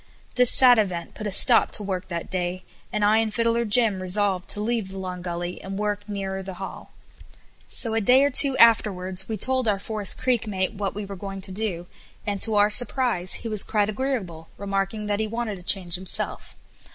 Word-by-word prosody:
This 250 -1 +4
sad 245 -3 +5
event 180 -5 -3
put 215 - -7
a - - -4
stop 230 +4 +5
to 210 - +2
work 190 -2 -5
that 170 -2 -6
day, 180 0 -4 0.3
and 210 -1 -1
I 215 +1 +3
and 225 -1 -1
Fiddler 230 +1 0
Jim 210 -3 +1
resolved 190 0 0
to - - -1
leave 225 -1 -2
the 190 - -10
Long 185 -1 -6
Gully, 175 0 -6
and 195 0 -7
work 205 0 -4
nearer 195 -1 -5
the 190 -1 -9
hall. 190 +1 -9 0.8
So 230 -3 +2
a 225 - 0
day 255 +6 +4
or 285 - +1
two 270 +1 +5
afterwards 190 -4 +3
we 220 - -3
told 260 +3 -1
our 205 -2 +1
Forest 205 0 0
Creek 245 -3 -1
mate 190 -1 -2
what 200 -2 -4
we 205 0 -5
were 200 0 -8
going 195 0 -8
to 190 - -5
do, 185 -4 -2 0.4
and, 200 -1 -4
to 220 - +7
our 205 +1 +3
surprise, 240 -6 +3
he - - -2
was 215 -3 +2
quite 210 -1 -1
agreeable, 205 - -5
remarking 195 +2 -3
that 205 0 -2
he 220 - -1
wanted 220 -3 -5
a - - -13
change 180 -1 +2
himself. 185 +1 -2
205 Hz, 210 wpm, -23 LUFS, 190-225 Hz, 0.8 s, to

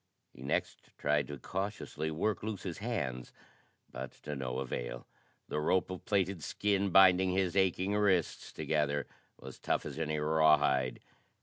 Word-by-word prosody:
He - - -14
next 65 - -2
tried 75 0 +1
to 75 - -6
cautiously 95 - -4
work 90 +6 -1
loose 105 -3 -4
his 90 -2 -5
hands, 75 - -3 0.6
but 65 +1 -6
to 75 -1 -4
no 65 -2 -3
avail. - - -4 0.4
The 75 - -2
rope 90 +4 +1
of 90 - -7
plaited 95 -5 0
skin 100 +2 0
binding 95 0 +6
his 95 -1 +1
aching 95 0 +2
wrists 100 -5 +1
together 75 -2 0 0.3
was - - -10
tough - - 0
as - - -6
any 80 -1 -1
rawhide. 75 -4 +3
80 Hz, 145 wpm, -32 LUFS, 75-95 Hz, 0.6 s, binding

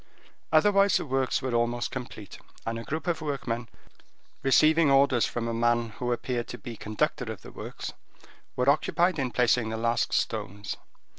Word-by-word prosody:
Otherwise, 195 +4 +5
the - - -3
works 135 -1 0
were 130 -2 -2
almost 120 +1 0
complete, 120 -6 -7 0.3
and 115 0 -2
a - - -7
group 155 +7 -4
of 170 -3 -1
workmen, 120 -6 -3 0.7
receiving 155 +3 +5
orders 135 -3 +4
from 120 -1 -3
a 115 - -1
man 120 0 +2
who 125 -1 -1
appeared 120 0 -2
to 125 - -6
be 120 -3 -8
conductor 110 +2 -2
of 105 -6 -9
the - - -10
works, - - -7 0.6
were 125 0 0
occupied 160 +4 +3
in 130 -2 0
placing 120 -2 +2
the 110 - -3
last 115 +1 +1
stones. 100 +2 -2
125 Hz, 165 wpm, -28 LUFS, 115-140 Hz, 0.7 s, Otherwise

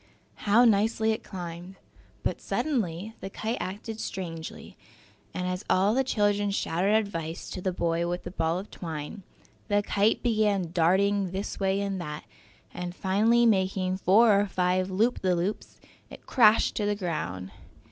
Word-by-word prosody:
How 235 +4 +6
nicely 220 +1 +3
it 220 - -2
climbed! 175 0 -7 0.5
But - - -2
suddenly 215 - -2
the 195 - -6
kite 220 +4 -3
acted 210 +4 -5
strangely, 165 -6 -6 0.6
and 180 0 -3
as 180 +2 -3
all 195 +3 +3
the 265 +2 +2
children 205 -4 +1
shouted 195 +1 +1
advice 170 -6 -2
to 185 - -5
the 185 - 0
boy 170 -1 0
with 175 +1 -3
the - - -7
ball 165 -1 0
of 195 +3 -7
twine, 160 +3 -6 0.5
the 205 -1 +2
kite 205 +2 +1
began 210 -7 +1
darting 190 +3 +2
this 190 +3 -5
way 195 0 +1
and 195 -2 -2
that, 150 -3 -6 0.5
and 180 0 -5
finally 220 +6 +3
making 190 -3 +1
four 200 +2 +5
or 205 - -1
five 185 0 0
loop 220 +6 +1
the 185 -1 +2
loops, 180 +5 -3 0.3
it - - -13
crashed 225 -4 +4
to 210 - 0
the 205 - +1
ground. 95 - -4
195 Hz, 155 wpm, -27 LUFS, 180-210 Hz, 0.6 s, How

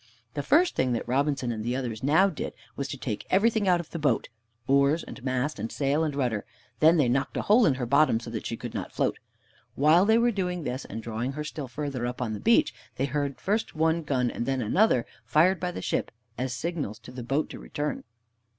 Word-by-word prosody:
The 145 - -2
first 340 - +3
thing 130 -1 +1
that 115 - -3
Robinson 135 -1 0
and 110 -2 -4
the 120 +2 -1
others 120 -5 -3
now 155 +8 +4
did 185 - -5 0.2
was 140 - -3
to 140 - -5
take 115 -5 -4
everything 215 +1 +3
out 180 -1 +4
of 170 - -8
the 165 - -4
boat 145 -7 +1 0.4
oars, 140 +4 +3
and 125 - -10
mast, 130 +1 -1
and 110 +2 -4
sail, 145 +2 +1
and 150 -3 -1
rudder; 120 -7 0 0.4
then 160 +2 +6
they 145 -5 +3
knocked 130 +3 0
a - - -1
hole 220 +3 +5
in 140 - +3
her 130 -2 -3
bottom, 140 -2 +4
so 115 0 -8
that 110 - -4
she 115 - -4
could - - -7
not - - -4
float. - - -1 0.6
While 155 +6 +5
they 220 +2 +5
were 240 +1 +3
doing 180 -4 -2
this, 130 -1 -4
and 110 +2 -7
drawing 115 +4 -3
her 150 +2 -4
still 150 -2 -5
further 130 -2 -3
up 125 - -5
on 120 -3 -2
the 105 - -4
beach, 230 +1 +3 0.2
they 135 - 0
heard 140 0 -2
first 210 -1 -1
one 160 +1 +2
gun 130 -5 0
and 120 - -4
then 135 -1 0
another 125 - +3 0.2
fired 175 +4 +3
by 180 - -1
the 180 - -6
ship - - -1 0.3
as 130 +2 -2
signals 145 -5 -3
to 115 +3 -13
the 125 0 -7
boat 135 +6 0
to - - -8
return. 150 0 -4
140 Hz, 230 wpm, -27 LUFS, 125-165 Hz, 0.6 s, then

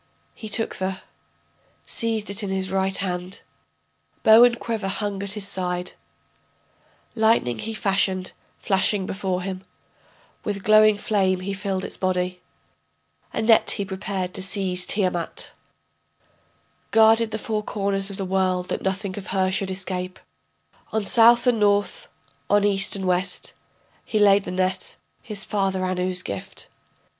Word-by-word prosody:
He 220 - -9
took 225 +1 -1
the... 190 0 -3 0.8
seized 220 -3 0
it 200 +2 -1
in 200 - -4
his 190 0 -2
right 190 0 +1
hand, 180 0 -4 0.8
Bow 220 +2 +8
and 240 -1 +4
quiver 225 -4 -3
hung 200 0 -3
at 200 0 -2
his 210 -2 -1
side, 180 -1 -1 1.2
Lightning 220 - +2
he 225 0 -5
fashioned 190 -2 0 0.3
flashing 195 0 +1
before 190 -2 -3
him, 185 -1 -5 0.8
With 200 -2 -4
glowing 215 0 +5
flame 190 -3 0
he 195 +2 -3
filled 190 -1 -3
its - - -5
body, 180 -1 -1 0.9
A 225 - -2
net 225 0 +4
he 200 - 0
prepared 190 -1 -4
to 195 - -1
seize 185 -1 +1
Tiamat, 180 -4 -1 1.4
Guarded 225 0 +5
the 220 - -3
four 215 0 -2
corners 200 -1 -2
of 195 - -8
the 195 - -3
world 185 -1 0
that - - -2
nothing 190 0 -3
of 190 - -10
her 190 -1 0
should 195 0 -1
escape, 185 -1 -3 0.7
On 215 -1 -1
South 235 +2 +5
and 245 -3 +3
North, 205 -1 +1 0.4
on 205 0 +4
East 200 0 +3
and 195 -1 -4
West 185 +1 0 0.5
He 215 - -2
laid 200 -1 +5
the - - -5
net, 185 0 -2 0.2
his 210 -2 -6
father 195 -2 -1
Anu's 180 0 0
gift. 100 -1 -7
195 Hz, 145 wpm, -23 LUFS, 185-210 Hz, 1.4 s, Bow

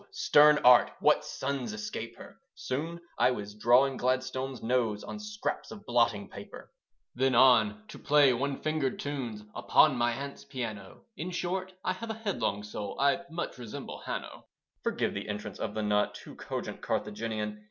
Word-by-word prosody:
Stern 150 0 +6
Art 125 -1 +8
what - - +4
sons 135 -5 -3
escape 105 0 -6
her? - - -13
Soon 160 +6 -4 0.2
I - - +5
was 105 -5 -4
drawing 125 +5 +4
Gladstone's 130 +1 -1
nose 115 -3 0
On 210 - -7
scraps 210 0 -4
of 205 -1 -10
blotting 115 -4 +2
paper. - - -11 0.4
Then 130 0 +2
on 130 - +5
to - - -10
play 145 -3 +5
one 135 +3 -1
fingered 155 -4 0
tunes 125 -7 -4
Upon 135 +4 +4
my 120 0 +1
aunt's 140 +2 -6
piano. 115 -8 -6 0.2
In 170 - -4
short, 185 +1 -3
I 185 - +1
have 225 +5 -7
a 220 - -2
headlong 200 - -2
soul, 105 0 -6
I 140 +5 +3
much 165 -5 -5
resemble 115 -3 -7
Hanno. - - -6 0.3
(Forgive - - -1
the - - -5
entrance 105 -1 -5
of 105 -1 -3
the 110 - -1
not 105 0 +1
Too - - -10
cogent - - -5
Carthaginian. 105 0 -3
130 Hz, 165 wpm, -30 LUFS, 110-150 Hz, 0.4 s, Art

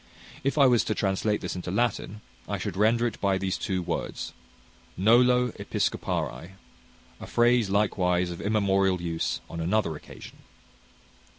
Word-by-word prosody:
If 140 +3 0
I 140 - +6
was 125 -3 +4
to 110 - -1
translate 105 +2 0
this 90 - -4
into 90 0 -5
Latin, 105 0 -1 0.3
I - - -1
should - - -4
render 115 +4 +3
it 120 -1 -3
by 100 -1 +2
these 95 -1 -1
two 95 -2 -2
words, - - -4 0.6
Nolo 125 +5 +4
Episcopari: 90 +3 -2 0.7
a - - -8
phrase 120 -3 +3
likewise 90 -3 +1
of 85 - -7
immemorial 100 -3 +2
use 80 -8 -2
on 85 - -7
another 85 -1 0
occasion. - - -12
100 Hz, 140 wpm, -27 LUFS, 90-115 Hz, 0.7 s, I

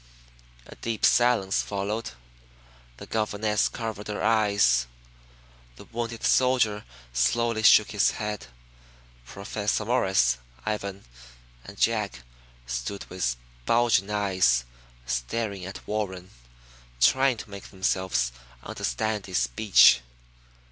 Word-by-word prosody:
A - - -12
deep 115 -2 -1
silence 120 -6 +3
followed. 105 - -4 0.8
The - - -9
governess 105 -1 0
covered 110 -3 -6
her 105 - -4
eyes. 100 - +3 0.9
The - - -13
wounded 115 0 -5
soldier 125 -5 +2 0.3
slowly 110 - +1
shook 110 -1 +6
his 105 -2 +3
head. 105 - -5 0.8
Professor 105 +2 -3
Morris, 95 - +2 0.3
Ivan 100 -2 -4 0.6
and 100 +1 -11
jack 105 - 0 0.4
stood - - -4
with 85 -10 -1 0.3
bulging 115 -4 +3
eyes 95 -13 +2 0.4
staring 90 - -3
at 95 - -10
Warren, 95 -3 -4 0.7
trying 130 - +4
to 110 - -10
make 100 0 -9
themselves 95 -10 0 0.3
understand 105 - -3
his 95 - -2
speech. 60 - +5
100 Hz, 100 wpm, -26 LUFS, 95-110 Hz, 0.9 s, shook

